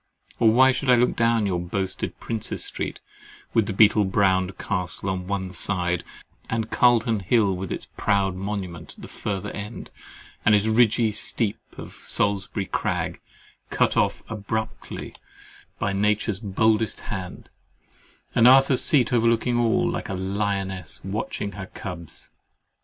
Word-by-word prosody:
Or 115 - +6
why 130 +4 +6
should 135 +1 -2
I 125 - +8
look 120 +1 +2
down 115 -2 +2
your 90 -3 0
boasted 95 +2 -2
Prince's 115 -2 -3
Street, - - -4 0.5
with 110 -3 +3
the - - -2
beetle 105 +1 +5
browed 95 -1 +1
Castle 95 -1 -3
on 90 -1 -4
one 95 -2 -2
side, 90 -1 -1 0.5
and 115 0 0
the - - -10
Calton 115 -2 +4
Hill 100 0 +2
with 95 0 -5
its - - -4
proud 100 -2 +1
monument 95 -3 -5
at - - -14
the - - -7
further 100 -3 -4
end, 105 +2 -7 0.5
and 105 - +5
the 105 +2 +2
ridgy 115 -1 +3
steep 105 +1 0 0.2
of - - -9
Salisbury 100 0 -1
Crag, - - -2 0.5
cut - - +1
off - - +1
abruptly 110 +1 -5 0.6
by 100 - -1
Nature's 105 0 +1
boldest 110 +1 +1
hand, 90 -3 -7 0.8
and 120 0 +6
Arthur's 135 0 +6
Seat 125 -5 +3
overlooking 115 +1 +2
all, 115 -2 +2
like - - -3
a 95 - -2
lioness 95 -2 -3
watching 100 +1 -3
her 95 -2 -7
cubs? 85 -4 -9
100 Hz, 145 wpm, -24 LUFS, 95-115 Hz, 0.8 s, I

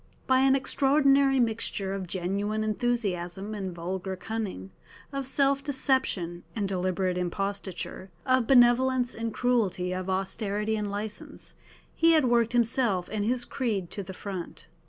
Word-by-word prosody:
By 260 0 +4
an 265 0 +5
extraordinary 275 0 +3
mixture 220 -4 0
of 195 -2 -4
genuine 200 +4 -2
enthusiasm 205 -4 -1
and 195 -3 -4
vulgar 185 +2 -4
cunning, 185 - -5 0.4
of 275 -1 -3
self 275 0 +2
deception 260 - 0
and 205 -3 -1
deliberate 185 -1 -1
imposture, 195 +1 -4 0.2
of 255 -3 +2
benevolence 250 0 +4
and 230 0 -3
cruelty, 210 -8 0
of 185 +1 -4
austerity 205 +3 -1
and 210 -1 -2
licence, 205 +1 -6 0.4
he 330 0 +4
had 310 -4 +4
worked 235 -1 +2
himself 230 -6 +2
and 210 -1 -1
his 240 +1 0
creed 210 -11 -2
to 200 - -4
the 190 - -8
front. 190 -4 -7
215 Hz, 135 wpm, -28 LUFS, 190-250 Hz, 0.4 s, an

